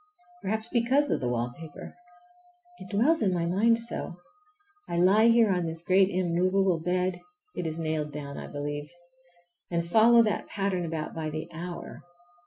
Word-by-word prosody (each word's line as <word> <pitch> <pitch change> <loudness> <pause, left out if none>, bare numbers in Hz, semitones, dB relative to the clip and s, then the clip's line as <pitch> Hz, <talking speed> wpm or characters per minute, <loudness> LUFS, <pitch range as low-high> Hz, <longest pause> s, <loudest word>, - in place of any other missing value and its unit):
Perhaps 220 +3 -2
because 265 +5 +2
of - - +1
the 125 - -1
wallpaper. 120 +6 -5 0.9
It 185 - -10
dwells 270 - +2
in 195 - +2
my 175 -2 0
mind 215 +7 +3
so! 230 -6 -3 0.7
I 170 - -2
lie 195 +6 +5
here 230 -3 +5
on 180 -2 0
this 165 +1 -5
great 190 +2 +4
immovable 185 0 +1
bed—it 185 - -3
is 160 0 -4
nailed 155 -2 -2
down, 140 -1 -7
I - - -7
believe—and 175 +4 -7
follow 230 +5 +6
that 215 -2 -1
pattern 195 -3 -2
about 160 -2 -4
by 160 -1 -3
the 155 +1 -5
hour. 170 +1 -7
175 Hz, 150 wpm, -28 LUFS, 165-205 Hz, 0.9 s, follow